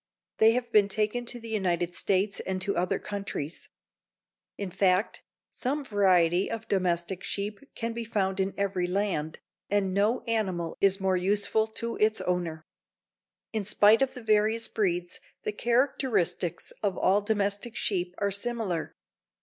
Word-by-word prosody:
They 220 +1 +6
have 240 -1 -2
been 210 -3 +5
taken 215 +4 -1
to 240 +1 0
the 230 -1 -8
United 175 -4 0
States 195 +3 +1
and 190 0 -3
to 200 - -1
other 180 +1 +1
countries. 195 -6 -5 0.9
In 200 -3 -4
fact, 185 +2 +1 0.3
some 280 +3 -2
variety 185 -4 +3
of 225 -1 -5
domestic 180 -1 0
sheep 205 +1 -3 0.2
can 230 0 -3
be 235 0 -4
found 195 -4 -1
in 190 0 -1
every 190 -3 0
land, 180 -5 -2 0.3
and 195 -2 +1
no 210 +5 +2
animal 190 -8 -1
is 195 0 +4
more 190 -1 +1
useful 205 +4 +2
to 230 +1 -3
its 215 +1 +2
owner. 170 -3 -2 0.9
In 215 -2 -1
spite 215 +3 +5
of 270 - +1
the 250 - -8
various 220 +1 +2
breeds, 175 -4 -1 0.2
the - - -1
characteristics 235 - 0
of 200 -4 -1
all 195 +2 +3
domestic 205 +2 -1
sheep 180 -4 -1
are 200 0 0
similar. 200 -5 -2
200 Hz, 150 wpm, -28 LUFS, 185-220 Hz, 0.9 s, They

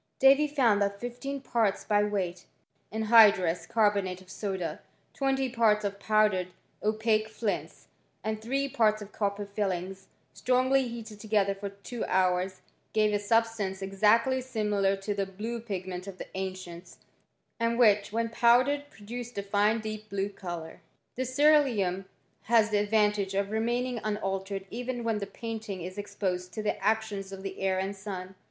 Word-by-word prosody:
Davy 275 +3 +6
found 245 -8 +3
that 200 0 0
fifteen 245 +4 -5
parts 220 -6 0
by 205 -1 +2
weight 185 -4 -2 0.4
I - - -10
of 220 - 0
anhydrous 205 -6 +5
carbonate 200 -4 +1
of 185 0 -15
soda, 190 -4 -3 0.3
twenty 270 -1 0
parts 225 -4 +2
of 200 0 -3
pow 215 0 +4
dered 185 -3 -2 0.3
Opaque 215 0 +1
flints, 220 -2 -3 0.4
and 215 0 -2
three 270 +5 -1
parts 215 -4 +2
of 205 - -12
copper 205 -1 -2
filings, 195 -2 -3 0.3
I - - -12
nrongly 255 +1 +3
heated 225 -3 -8
together 205 -2 +1
for 200 +1 -6
two 200 +4 -7
hours, 185 0 +1 0.3
gave 215 -1 +3
a 205 - +2
sub 225 +3 +3
stance 200 -4 -4
exactly 220 +7 +3
similar 210 -6 0
to 195 +2 -3
the 200 -1 -2
blue 220 +5 -5
pigment 190 -4 -5
of 195 -2 -8
the - - -5
t - - -19
ancients, 185 -2 -6 0.6
and 230 0 +1
which, 210 -5 +4
when 230 +1 0
powdered, 255 +5 +3
produced 240 +1 -8
a 200 - -1
fine 205 +3 +2
deep 215 0 -6
blue 200 0 -1
colour. 175 -5 -7 0.3
This 255 0 -3
ceeruleum 245 -12 +3 0.4
has 220 -1 +4
the 205 - +3
advantage 210 -2 +1
of 200 +1 0
remaining 240 +2 0
unaltered 195 -2 -2
even 245 +1 -4
when 225 -2 0
the 200 - -4
painting 220 -4 -6
is 185 +3 -6
exposed 190 -3 -3
to 215 - -4
the 210 - -2
actions 210 -2 0
of 195 0 -8
the 195 -1 -6
air 190 -1 +1
and 190 +1 -2
sun. 190 -2 -6
210 Hz, 165 wpm, -29 LUFS, 195-230 Hz, 0.6 s, Davy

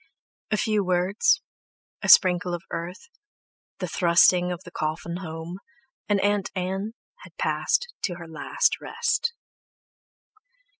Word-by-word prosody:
A 215 - +1
few 215 -1 +1
words, 185 - +2 0.6
a - - -2
sprinkle 180 -1 +6
of 170 - -8
earth, 175 - -6 0.7
the - - -3
thrusting 175 +1 +4
of 175 - -5
the - - -11
coffin 160 +2 -3
home, 165 0 -7 0.5
and 205 -1 +3
Aunt 205 -1 +1
Ann 190 +4 -2 0.3
had - - -15
passed 485 0 0
to 180 - -3
her 170 -1 -9
last 160 -1 0
rest. 465 0 -1
180 Hz, 120 wpm, -25 LUFS, 175-205 Hz, 0.7 s, sprinkle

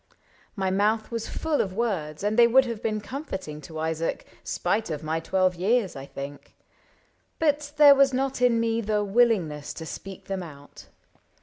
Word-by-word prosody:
My 190 -3 -1
mouth 215 +3 +1
was 230 -1 -4
full 315 -2 0
Of 190 - -3
words, 185 -9 -2
and 210 +1 +1
they 235 0 +7
would 260 +3 +5
have 230 -3 -5
been 215 -1 -1
comforting 190 - -6
To 160 +2 -9
Isaac, 160 +1 -2 0.2
spite 220 -3 -1
of 155 -1 -4
my 160 +1 -1
twelve 185 +2 +1
years, 195 +1 +1
I 135 0 -8
think; 140 +1 -9 0.8
But 295 -2 0
there 290 -1 +9
was 275 -1 +4
not 265 0 -1
in 240 -2 +4
me 230 0 0
the 210 -1 0
willingness 195 -9 +1
To 160 - -7
speak 195 +3 -8
them 195 -1 -3
out. 145 -4 -12
210 Hz, 175 wpm, -26 LUFS, 165-240 Hz, 0.8 s, there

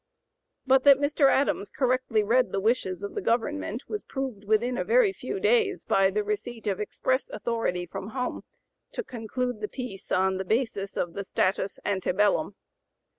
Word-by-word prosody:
But 265 0 +4
that 280 -1 +9
Mr. 285 0 +3
Adams 265 -7 +1
correctly 255 -4 +1
read 245 +4 +2
the 195 - 0
wishes 195 -4 0
of 200 - -5
the - - -3
government 240 +1 -1
was 425 - -3
proved 260 -7 -5
within 225 +4 +2
a - - -1
very 465 -4 +4
few 395 - -5
days 435 -4 +2
by 195 0 +3
the 210 +2 -1
receipt 220 +3 -4
of 200 -3 -1
express 260 +5 -1
authority 210 -5 -2
from 185 +3 -7
home 250 +3 -3 0.5
"to 485 - -3
conclude 245 - -4
the 210 - -2
peace 245 -7 -7
on 190 0 +2
the 190 - -2
basis 215 -1 -1
of 170 - -1
the 200 - -4
status 195 0 0
ante 190 -3 0
bellum." 210 - +2
230 Hz, 175 wpm, -27 LUFS, 200-265 Hz, 0.5 s, that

